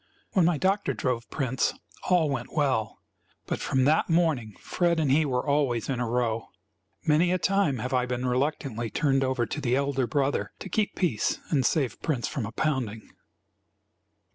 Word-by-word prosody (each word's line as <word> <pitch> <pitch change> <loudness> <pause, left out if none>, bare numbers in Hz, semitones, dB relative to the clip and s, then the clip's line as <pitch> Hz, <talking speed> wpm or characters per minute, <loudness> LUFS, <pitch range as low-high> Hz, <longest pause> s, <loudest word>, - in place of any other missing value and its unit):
When 185 -4 +3
my 170 -2 +2
doctor 195 +6 +1
drove 120 -3 -2
Prince, 130 -3 0 0.3
all 175 -4 +4
went 125 -3 -4
well; 130 -8 0 0.5
but - - -3
from 130 -1 +1
that 150 +6 +3
morning 155 - +1
Fred 170 -2 0
and 150 -4 +2
he 155 +3 +4
were 125 -3 -1
always 140 -6 +1
in 130 -3 -1
a 120 -2 -1
row. 115 -2 0 0.6
Many 160 +3 +3
a 185 - +2
time 190 -7 +1
have 125 +4 -4
I 125 -1 +2
been 125 0 -2
reluctantly 125 -2 -1
turned 135 +2 +1
over 130 -2 0
to 150 - -5
the 125 -2 +1
elder 140 -2 0
brother 140 +3 0
to 190 - -8
keep 210 +3 0
peace 155 - 0
and 140 -5 +3
save 135 0 0
Prince 140 -7 -1
from 115 -7 -3
a - - -7
pounding. 120 -7 -2
135 Hz, 175 wpm, -27 LUFS, 125-155 Hz, 0.6 s, all